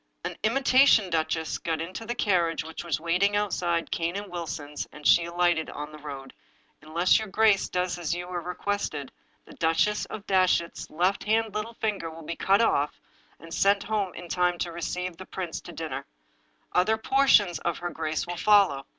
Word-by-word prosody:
An - - -4
imitation 255 -4 +4
duchess 160 0 -1
got 160 -1 -2
into 185 +7 -6
the 240 - -2
carriage, 175 -7 +1
which 160 +2 -7
was 170 -3 -1
waiting 180 +5 +1
outside 175 -5 0
Cane 170 +1 -1
and 200 -1 -5
Wilson's, 155 -4 -5
and 150 0 -13
she 170 - +6
alighted 175 -1 +1
on 150 +1 -6
the 155 - -11
road. 135 -3 -8 0.5
Unless 170 +6 +3
your 220 - -5
grace 210 0 +3
does 180 -1 -1
as 170 - -2
you 175 0 -5
are 175 -1 -3
requested, 180 -5 -3 0.3
the - - -14
Duchess 165 +6 +1
of 205 - -8
Datchet's 185 -3 +1
left 180 +5 0
hand 220 0 +1
little 215 +2 -4
finger 205 -8 -2
will 160 0 -10
be 170 - -4
at - - -14
once - - -6
cut 195 +3 +5
off, 150 -10 +1 0.4
and 165 0 -11
sent 200 0 +3
home 205 -3 -1
in 175 - -8
time 180 0 +1
to 175 - -3
receive 175 +1 -4
the - - -9
prince - - -5
to - - -10
dinner. - - -5 0.6
Other 215 +5 +3
portions 220 - +4
of 170 - -2
her 175 0 -4
grace 155 -1 -2
will 175 0 -5
follow. 195 -9 +4
175 Hz, 190 wpm, -27 LUFS, 165-205 Hz, 0.6 s, she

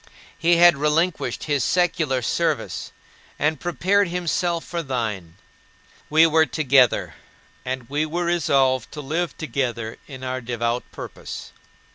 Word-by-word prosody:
He 170 +1 +3
had 175 -3 +7
relinquished 155 +4 0
his 145 -5 0
secular 160 -7 +1
service, - - -1 0.5
and 150 0 0
prepared 190 +4 +1
himself 175 -1 -1
for 170 -1 -3
thine. 110 - -3 0.7
We 160 +2 +6
were 160 0 +4
together, 135 -5 +3 0.5
and 130 -1 -4
we 150 +4 -1
were 175 +3 -2
resolved 135 -7 +2
to 150 - -6
live 160 +5 -2
together 120 -6 -3
in 130 -3 -9
our 130 0 -3
devout 120 0 -2
purpose. - - -8
150 Hz, 125 wpm, -23 LUFS, 130-170 Hz, 0.7 s, had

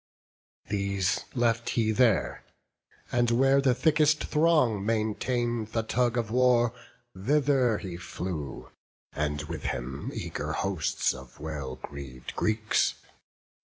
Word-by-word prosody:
These 100 -2 0
left 115 -1 +1
he 110 -2 +1
there; 115 -2 +2 0.7
and 120 -1 +2
where 135 +3 +4
the 130 -3 +3
thickest 150 +3 +3
throng 150 -10 +3
Maintain'd 115 +1 -1
the 115 - +1
tug 120 +2 +1
of 115 -2 -1
war, 120 -1 +4 0.4
thither 130 +2 +2
he 90 -4 -6
flew, 85 -5 -6 0.4
And 75 -1 -2
with 80 0 -6
him 65 +3 -3
eager 75 +1 -4
hosts 95 -3 0
of 65 -1 -12
well 70 -4 -5
greav'd 65 -1 -9
Greeks. 110 0 +1
110 Hz, 115 wpm, -28 LUFS, 85-125 Hz, 0.7 s, where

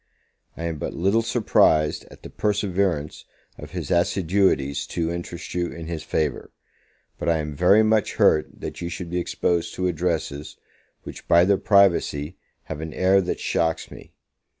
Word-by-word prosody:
I 85 - -6
am 85 -3 -3
but - - -4
little 100 +6 +2
surprised 105 -9 +2
at - - -16
the - - -9
perseverance 95 -7 -1 0.3
of - - -9
his - - -5
assiduities 85 -5 +1
to 85 -1 -2
interest 85 0 -6
you 90 -1 -1
in 85 -1 -8
his 80 -1 -5
favour; 75 -4 -2 0.7
but - - -1
I 85 - +3
am 75 -1 -4
very 95 +8 +5
much 110 -1 +1
hurt 75 - +3
that - - -6
you 85 - -3
should 85 -1 -6
be 90 - 0
exposed 85 -1 -1
to 90 - -2
addresses, 80 -4 -2 0.5
which, - - -10
by 85 +1 +5
their 100 0 +2
privacy, 90 -6 +2 0.3
have 80 -1 -7
an 80 -1 -6
air 95 +1 +4
that 90 - -3
shocks 80 -1 -1
me. - - -13
85 Hz, 165 wpm, -23 LUFS, 80-95 Hz, 0.7 s, very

